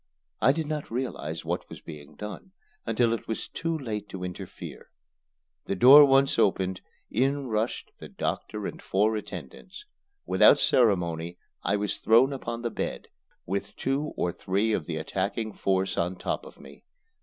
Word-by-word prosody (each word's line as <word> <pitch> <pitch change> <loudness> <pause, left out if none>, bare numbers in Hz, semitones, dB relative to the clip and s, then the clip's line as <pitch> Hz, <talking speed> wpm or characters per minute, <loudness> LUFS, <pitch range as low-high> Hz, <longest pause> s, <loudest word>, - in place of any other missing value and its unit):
I 130 - +6
did 160 +2 -2
not 150 -1 -4
realize 125 +3 -4
what - - -3
was - - -9
being 75 -3 -11
done 105 - -8 0.3
until 115 +1 +2
it 115 - -4
was 110 - -3
too 165 -1 -2
late 105 -7 -5
to 95 -1 -6
interfere. 90 -1 -8 0.8
The - - -1
door 135 +8 +10
once 135 0 +3
open, 95 -1 +2 0.3
in 135 +4 +1
rushed 110 -1 -2
the - - -9
doctor - - -3
and - - -6
four 105 +3 +1
attendants. 105 - -8 0.4
Without - - +6
ceremony 85 -7 +2 0.2
I 100 - +1
was 105 -1 -1
thrown 120 +5 +5
upon 120 -3 -5
the 120 - -1
bed, - - -4 0.4
with 100 +2 -3
two 140 +3 -1
or 90 - 0
three 100 +5 0
of 85 -7 -2
the 80 - -3
attacking 100 +7 -2
force 95 -1 0
on 90 +2 0
top - - -3
of - - -15
me. - - -14
110 Hz, 160 wpm, -27 LUFS, 95-130 Hz, 0.8 s, door